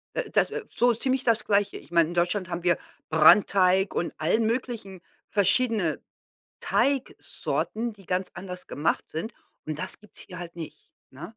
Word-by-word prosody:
Äh, - - -2
das - - +2 0.2
so 240 +1 +4
ziemlich 260 +3 0
das 230 -2 +2
Gleiche. 200 -1 +1
Ich - - -15
meine, 170 -1 +4
in - - -5
Deutschland 180 +2 0
haben 170 0 -4
wir 175 -2 +3 0.3
Brandteig 185 +4 +5
und 170 - -2
allen 200 +9 +2
möglichen 225 -6 -3 0.3
verschiedene 210 -4 +2 0.6
Teigsorten, 240 -4 -1
die 195 -3 -18
ganz 180 +2 -1
anders 180 -1 -8
gemacht 150 +3 -1
sind 185 +9 -4 0.3
und 155 -1 -4
das - - -3
gibt's 210 - -11
hier 180 -2 -8
halt 170 -1 -8
nicht, 155 -3 -9 0.2
ne? 160 +8 -9
190 Hz, 160 wpm, -26 LUFS, 170-225 Hz, 0.6 s, Brandteig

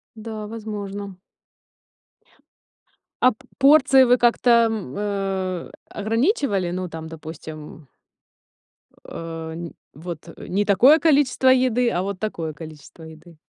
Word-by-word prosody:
Да, 215 -1 -7
возможно. 205 -3 -7 2.0
А 255 - +6
п 215 - -14 0.2
порции 270 -1 +6
вы 245 0 +4
как-то, 240 +1 +2 0.2
м, 205 -12 -5
э, 195 -3 -3 0.2
ограничивали? 225 - 0
Ну, 185 0 -3
там, 160 -1 -8
допустим 155 -2 -10 1.2
Э, 165 -1 -7
не 170 0 -7 0.2
вот 165 +2 -8
не 200 +2 -2
такое 250 - +6
количество 280 -4 +2
еды, 250 -2 +3
а 175 - -1
вот 195 -1 -5
такое 165 -7 -4
количество 155 +1 -12
еды. 160 +1 -14
200 Hz, 110 wpm, -22 LUFS, 165-235 Hz, 2.0 s, А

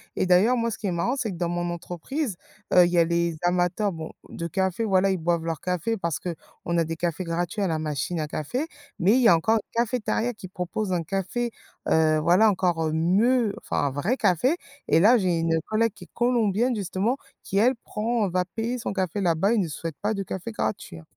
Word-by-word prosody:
et - - +1
d'ailleurs, 190 +8 +4
moi, 230 -1 0
ce - - -5
qui 205 - -3
est - - 0
marrant, 205 +10 0
c'est 220 -5 -2
que - - -6
dans 170 -1 -1
mon 175 0 -2
entreprise, 180 - -4 0.4
heu, 180 -1 +8
il 175 - -1
y 175 - +1
a 170 - +7
les 170 -1 0
amateurs 180 +3 +1
bon, 160 -1 -7 0.2
de 170 - -5
café, 190 +5 -1
voilà 195 -2 +3
ils 190 - 0
boivent 170 0 0
leur 165 -2 -3
café 180 +5 -1
parce 170 -4 -2
qu'on 170 0 -5
a 165 - +3
des 165 +1 -4
cafés 175 +2 -2
gratuits 175 +4 -2
à 195 - +2
la 160 -2 0
machine 155 +2 -2
à 155 - -2
café, 245 - -3 0.3
mais 195 +6 +4
il 255 - +4
y 230 - +6
a 170 - +7
encore 220 +8 +2
une 230 +2 -1
cafétéria 240 0 -1
qui 205 -4 -10
propose 185 +2 -3
un 170 -2 0
café, 195 +7 -2 0.4
heu, 155 -1 +4
voilà 180 +7 +5
encore 175 -4 +1
mieux, 205 +7 +2
enfin - - -1
un - - -2
vrai 175 - 0
café 215 - +2 0.3
et - - +4
là, 230 +7 +6
j'ai 180 -3 +1
une 165 0 +1
collègue 225 0 +1
qui - - -12
est - - -26
colombienne 240 0 +2
justement, 205 +5 -1 0.3
qui 195 - -3
elle 250 +4 +4
prend 225 -1 -1
va 180 +1 +1
payer 230 +3 -1
son 225 - -3
café 190 0 -1
là-bas 180 +5 +2
et - - +2
ne 180 - 0
souhaite 160 0 -5
pas 210 +2 0
de 200 - -2
café 190 +5 -5
gratuit 195 - -3
hein. 80 - -15
185 Hz, 230 wpm, -25 LUFS, 170-225 Hz, 0.4 s, heu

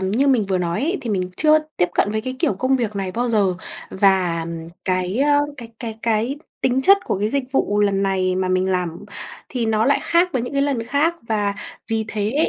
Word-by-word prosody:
như 210 +9 +1
mình 245 -6 +3
vừa 190 -1 0
nói 170 -1 -1
ấy, 350 +6 0
thì 235 - -4
mình 185 -3 -1
chưa 310 0 +5 0.2
tiếp 180 - +2
cận 205 - +2
với 215 +1 -1
cái 255 +3 -5
kiểu 210 - +1
công 260 +7 +1
việc 220 -5 -2
này 190 -2 -3
bao 240 +3 -1
giờ 200 -5 +2 0.4
và, 190 -3 +2
ờm, 165 0 -6 0.2
cái, 185 +2 0
ơ, 290 +1 +4 0.2
cái 235 -3 -8
cái 225 -2 -5
cái 230 +4 0 0.2
tính 260 +1 +1
chất 395 +7 +7
của - - -1
cái 210 +2 0
dịch 280 +2 0
vụ 205 -6 +1
lần 200 -1 +2
này 185 -1 +1
mà 185 0 0
mình 185 +1 +1
làm 180 0 -2 0.4
thì 240 -3 -2
nó 220 0 +2
lại 280 - +3
khác 345 +2 +3
với 255 - 0
những 245 - -5
cái 275 0 +2
lần 275 -5 0
khác 305 +6 +2
và 205 -2 0 0.3
vì 225 -1 0
thế 220 +9 0
215 Hz, 230 wpm, -21 LUFS, 190-260 Hz, 0.4 s, chất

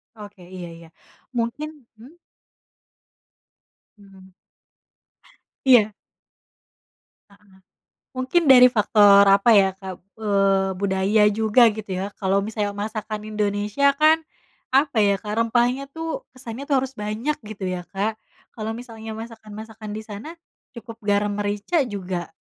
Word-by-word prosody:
Oke. 205 -3 -12
Iya 180 0 -9
iya. 165 0 -14 0.5
Mungkin 255 +3 -4
hmm? 245 +7 -15 1.8
Hmm. 195 -2 -17 1.3
Iya. 230 -5 +5 1.4
Heeh. 200 -1 -24 0.6
Mungkin 285 +5 +1
dari 250 -1 +9
faktor, 205 -3 +5
apa 200 +4 +5
ya, 195 -2 +5
Kak, 190 -1 -7 0.2
eee, 195 -2 +2
budaya 195 +2 +2
juga, 220 +2 +4
gitu 210 0 -7
ya. 190 +2 -3
Kalau 195 0 +1
misalnya 210 -1 -3
masakan 215 0 -5
Indonesia 210 +6 0
kan, 310 +2 +4 0.6
apa 280 -3 +3
ya, 200 -1 +3
Kak? 210 - -5
Rempahnya 240 +4 +1
tuh, 325 - -6
kesannya 255 +1 -8
tuh 275 -3 +2
harus 265 0 -5
banyak, 215 +8 -2
gitu 210 -2 -7
ya, 180 -1 -3
Kak, 210 +3 -3 0.3
kalau 220 0 -5
misalnya 225 -2 -8
masakan-masakan 220 -1 -9
di 215 - -6
sana, 215 +7 -9 0.4
cukup 230 -1 -10
garam 205 0 +1
merica 205 - -1
juga, 185 -5 -5
215 Hz, 120 wpm, -23 LUFS, 200-240 Hz, 1.8 s, dari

